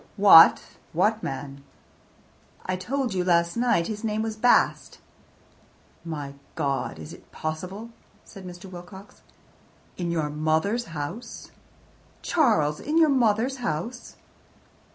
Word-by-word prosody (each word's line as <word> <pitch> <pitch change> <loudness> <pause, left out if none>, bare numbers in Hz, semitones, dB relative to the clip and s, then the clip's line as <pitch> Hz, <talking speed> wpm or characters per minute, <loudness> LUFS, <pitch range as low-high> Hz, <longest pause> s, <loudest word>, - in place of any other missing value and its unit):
"What 195 -5 +8 0.3
what 210 +6 +1
man?" 140 -2 -6 1.0
"I 185 - -1
told 245 +4 -2
you 180 -1 0
last 170 -1 +2
night. 235 -8 +1
His 210 +3 -5
name 215 0 -1
was 220 -1 -4
Bast." 245 +3 +2 1.1
"My 150 -4 -6 0.2
God, 140 - -2
is 80 -1 -9
it - - -16
possible?" 185 +8 -6 0.3
said 195 -3 -12
Mr. 180 +1 -10
Wilcox. 185 +2 -12 0.8
"In 175 -1 -3
your 160 -3 -1
mother's 160 +10 0
house! 170 +9 -7 0.7
Charles, 160 - +2
in 305 +3 -2
your 320 -2 +5
mother's 250 0 +1
house!" 240 +2 -5
185 Hz, 115 wpm, -25 LUFS, 160-225 Hz, 1.1 s, What